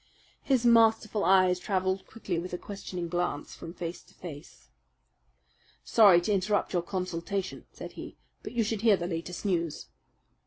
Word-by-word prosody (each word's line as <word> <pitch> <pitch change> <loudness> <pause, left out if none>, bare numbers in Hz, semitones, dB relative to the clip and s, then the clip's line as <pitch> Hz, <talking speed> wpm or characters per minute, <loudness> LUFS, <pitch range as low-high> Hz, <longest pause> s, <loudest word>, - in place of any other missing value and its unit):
His 255 -3 +1
masterful 225 -2 +4
eyes 185 0 +4
travelled 190 0 -1
quickly 195 -6 -4
with 180 +1 -6
a - - -1
questioning 180 -3 -6
glance 175 -4 -2
from 165 - -9
face 170 0 -6
to - - -22
face. 150 -5 -11 1.1
"Sorry 200 -6 +6
to 190 - -1
interrupt 200 +1 0
your 175 - +2
consultation," 185 +1 -4
said - - -9
he, - - -9 0.2
"but - - -8
you 235 -2 +2
should 215 -1 -2
hear 220 -4 +5
the 175 - -4
latest 175 +2 -5
news." 170 -5 -1
185 Hz, 155 wpm, -29 LUFS, 175-210 Hz, 1.1 s, Sorry